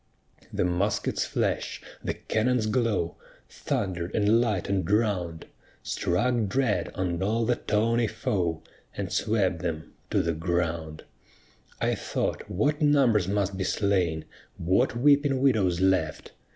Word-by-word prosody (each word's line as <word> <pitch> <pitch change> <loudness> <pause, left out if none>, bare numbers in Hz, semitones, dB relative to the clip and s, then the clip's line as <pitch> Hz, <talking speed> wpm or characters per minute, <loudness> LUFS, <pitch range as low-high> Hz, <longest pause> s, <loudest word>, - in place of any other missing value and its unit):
The - - 0
musket's 100 +4 0
flash, - - -1 0.2
the - - -2
cannon's 115 +1 0
glow, 110 -6 0 0.3
Thunder'd 90 -3 -3
and 110 +2 +4
lighten'd 100 -5 -1
round, 100 -6 0 0.4
Struck 115 +5 0
dread 125 +1 0
on 90 -2 -2
all 110 +4 +1
the 120 +1 +1
tawny 115 +2 +1
foe, 85 -5 -2 0.3
And - - -3
swept 95 -6 +1
them 80 -2 -4 0.2
to - - +2
the 85 - 0
ground. 80 -1 -2 0.8
I - - +1
thought - - -3
what 145 - 0
numbers 130 - +4
must 100 -1 0
be 95 - -1
slain, 90 -7 0 0.3
What 95 +7 +1
weeping 140 +1 +4
widows 105 -10 +2
left! 95 -5 +1
100 Hz, 125 wpm, -27 LUFS, 85-115 Hz, 0.8 s, and